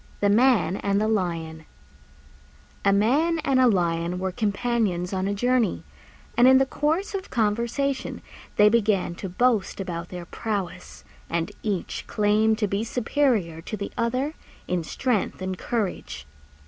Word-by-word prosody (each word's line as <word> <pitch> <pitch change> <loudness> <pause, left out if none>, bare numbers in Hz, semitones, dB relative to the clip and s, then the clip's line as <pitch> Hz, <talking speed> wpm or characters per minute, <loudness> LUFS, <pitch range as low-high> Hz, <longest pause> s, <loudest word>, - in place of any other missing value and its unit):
THE 205 - +2
MAN 210 -6 +3
AND 200 0 0
THE 215 - +1
LION 165 -6 -2 1.2
A 200 - +4
Man 275 +12 +3
and 265 -2 +3
a 255 - +6
Lion 170 -4 +1
were 190 +1 -2
companions 205 -3 -1
on 190 0 -1
a 200 - 0
journey, 245 +1 +1 0.5
and 245 +1 +6
in 260 0 +8
the 270 - +4
course 315 +9 -1
of 390 -1 -4
conversation 235 +5 -1 0.3
they 210 - +6
began 210 -5 +2
to 190 +2 -6
boast 220 +1 +1
about 175 -3 -4
their 180 -1 -7
prowess, 195 -3 -5 0.3
and 170 +3 -1
each 200 -5 -3
claimed 215 +1 +2
to 215 -2 0
be 200 +2 -1
superior 230 - 0
to 215 - -5
the 200 - -5
other 255 +6 -1 0.3
in 180 -2 -1
strength 235 +5 -1
and 185 -1 -4
courage. 185 - -3
210 Hz, 150 wpm, -25 LUFS, 180-240 Hz, 1.2 s, in